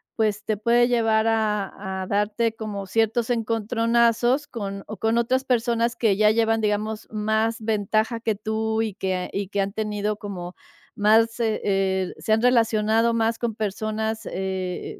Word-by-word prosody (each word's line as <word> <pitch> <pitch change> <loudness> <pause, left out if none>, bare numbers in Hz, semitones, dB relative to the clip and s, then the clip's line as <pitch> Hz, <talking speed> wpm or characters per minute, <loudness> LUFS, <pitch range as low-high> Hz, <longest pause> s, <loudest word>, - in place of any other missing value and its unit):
pues, 215 -1 0
te 215 - -1
puede 235 +3 +3
llevar 225 -2 +2
a 210 -3 -1
a - - -5
darte 210 +3 0
como 210 -3 -5
ciertos 225 +4 0
encontronazos 230 +3 +1
con 200 -7 -6
o 215 - -8
con 225 +3 +1
otras 255 +3 +1
personas 235 -2 +1
que 220 -5 +2
ya 210 0 +5
llevan, 225 0 +2
digamos, 215 +1 -2
más 220 +1 0
ventaja 215 +1 0
que 225 -1 -1
tú 220 +1 -1
y 215 -3 -3
que 185 -2 -3
y 200 0 -2
que 200 +1 -3
han 195 0 -2
tenido 210 -1 -2
como 185 -4 -7 0.4
más, 225 +2 +3
eh 225 -2 0
eh, 190 -2 0
se 220 - 0
han 220 - +2
relacionado 225 -1 +3
más 225 0 0
con 235 -3 -2
personas, 220 +1 -3
eh, 190 -1 -4
220 Hz, 160 wpm, -24 LUFS, 205-230 Hz, 0.4 s, ya